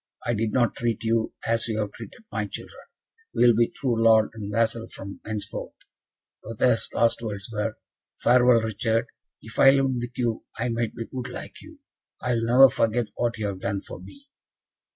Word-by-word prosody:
I 120 - +1
did 110 0 -1
not 120 -1 +2
treat 115 -2 -1
you 115 0 0
as 115 0 +1
you 110 -2 -2
have 105 -2 -2
treated 240 - -11
my - - -2
children. - - -9 0.5
We - - +4
will 120 -2 +6
be 115 +1 +4
true 120 -4 -1
lord 110 -1 +5
and 105 -2 -6
vassal 115 +1 0
from 100 -3 -9
henceforth." 105 -1 -5 0.7
Lothaire's 115 +1 +1
last 115 0 +2
words 105 -2 -6
were, 105 +1 -2 0.4
"Farewell, 125 -1 +5
Richard. 110 +1 0 0.4
If 115 - -8
I 135 - +9
lived 135 -2 +3
with 120 0 -7
you, 120 -3 -1
I 120 +2 -1
might 115 -1 -2
be 115 - -5
good 125 0 -6
like - - -8
you. 315 -2 -15 0.4
I 125 - -1
will 115 -1 0
never 125 +3 +8
forget 115 0 0
what 120 0 -1
you 110 - -3
have 100 -2 -3
done 95 +1 -2
for - - -9
me." 280 0 -14
115 Hz, 190 wpm, -25 LUFS, 110-120 Hz, 0.7 s, I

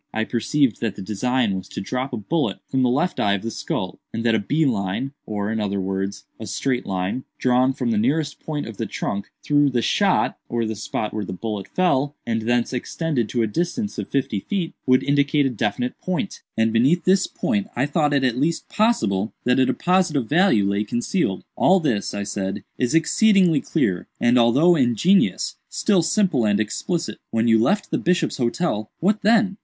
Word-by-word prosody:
I 110 - +1
perceived 120 +1 0
that 115 -4 -2
the 100 - -7
design 110 +2 0
was 95 - -6
to - - -6
drop 125 +7 -3
a 125 - -3
bullet 150 +9 -1
from 130 - -1
the 125 - +3
left 150 +9 0
eye 100 -1 +2
of 100 - -5
the 115 - -3
skull, - - -4
and 115 - -4
that 115 -1 +3
a 110 - +3
bee 150 +10 +1
line, 105 +1 -1 0.2
or, 105 -1 -2
in 110 - -1
other 100 -2 -1
words, 95 +1 -3 0.2
a 110 - -7
straight 125 +5 -2
line, 95 +6 -2
drawn 125 +1 +3
from 125 -3 -2
the 110 - +1
nearest 145 +6 0
point 150 -2 -4
of 115 -3 -8
the - - -3
trunk 100 0 -4
through 145 -1 +3
'the 120 -3 0
shot,' 200 -2 +1
(or 115 -1 -1
the 110 0 -3
spot 105 +1 -4
where 105 -1 -2
the 95 - -6
bullet 105 +1 -5
fell,) 145 -6 +1
and 115 -1 -1
thence 120 +2 0
extended 130 -1 -2
to 120 -2 0
a - - +2
distance 175 - -2
of - - -5
fifty 130 -7 -1
feet, 180 - -3
would 130 0 +4
indicate 140 0 +2
a 135 - +1
definite 120 +2 -2
point—and 140 - -2
beneath 135 +10 +3
this 190 +1 +3
point 205 -4 -1
I 130 - +1
thought 150 0 +1
it 140 -2 +2
at 125 -1 +1
least 160 +4 -1
possible 110 - +1
that 125 +1 +2
a 130 - +4
deposit 180 -3 +1
of 130 -5 0
value 150 - +3
lay 100 +1 0
concealed." 120 - -1
"All 190 +1 +4
this," 115 - -1
I 100 - -2
said, 100 0 -4 0.2
"is 125 +4 +1
exceedingly 180 -2 +4
clear, 90 -2 -1
and, 120 +1 +4
although 140 +10 +5
ingenious, 135 - +2
still 200 -5 +2
simple 165 - +1
and 105 -1 +2
explicit. 160 - -2
When 115 +1 0
you 115 -1 +5
left 200 - +1
the - - 0
Bishop's 180 +1 0
Hotel, 120 -4 -1
what 205 +5 +1
then?" 215 -2 +3
125 Hz, 200 wpm, -22 LUFS, 110-160 Hz, 0.2 s, although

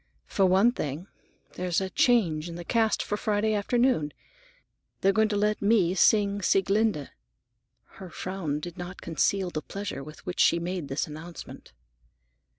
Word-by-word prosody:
"For 195 -2 +2
one 195 +6 +4
thing, 155 - -4 0.5
there's 180 -1 -1
a 190 -1 -4
change 175 -10 +2
in 170 - -7
the 175 0 -7
cast 225 +1 +1
for 210 - -2
Friday 215 +1 0
afternoon. 210 - +1 0.9
They're 195 +1 +4
going 220 +1 +3
to 210 - -1
let 210 +1 +1
me 200 -4 +3
sing 200 +1 +3
Sieglinde." 195 -4 +1 0.7
Her 190 -2 -12
frown 175 -6 -4
did 175 +1 -8
not 175 +1 -7
conceal 180 +3 0
the 155 - -3
pleasure 195 -8 -6
with 155 +2 -12
which 180 - -5
she - - +5
made 175 -2 -3
this 135 +2 -1
announcement. 160 +3 -10
190 Hz, 155 wpm, -27 LUFS, 170-210 Hz, 0.9 s, she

